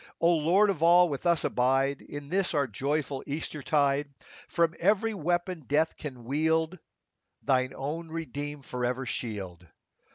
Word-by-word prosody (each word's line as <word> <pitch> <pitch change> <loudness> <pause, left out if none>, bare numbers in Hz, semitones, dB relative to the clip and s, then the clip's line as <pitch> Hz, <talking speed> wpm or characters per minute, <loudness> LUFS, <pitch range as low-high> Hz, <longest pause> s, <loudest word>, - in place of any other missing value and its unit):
O 170 - +4
Lord 180 +6 +4
of 165 -5 -6
all! 175 +1 +6
with 145 +4 -3
us 170 -2 +3
abide 135 +2 +1
In 145 -1 -8
this 185 -1 0
our 145 -1 +3
joyful 140 +4 -2
Easter 150 +1 -3
tide: 140 0 +1 0.4
From 170 -1 +1
every 215 +4 +2
weapon 175 -2 -2
death 155 +3 +2
can 130 -5 -8
wield 160 +6 0 0.6
Thine 130 -1 +1
own 155 +5 -4
redeemed 145 -3 -5
forever 125 +1 -2
shield. 95 -8 -5
150 Hz, 140 wpm, -28 LUFS, 135-170 Hz, 0.6 s, all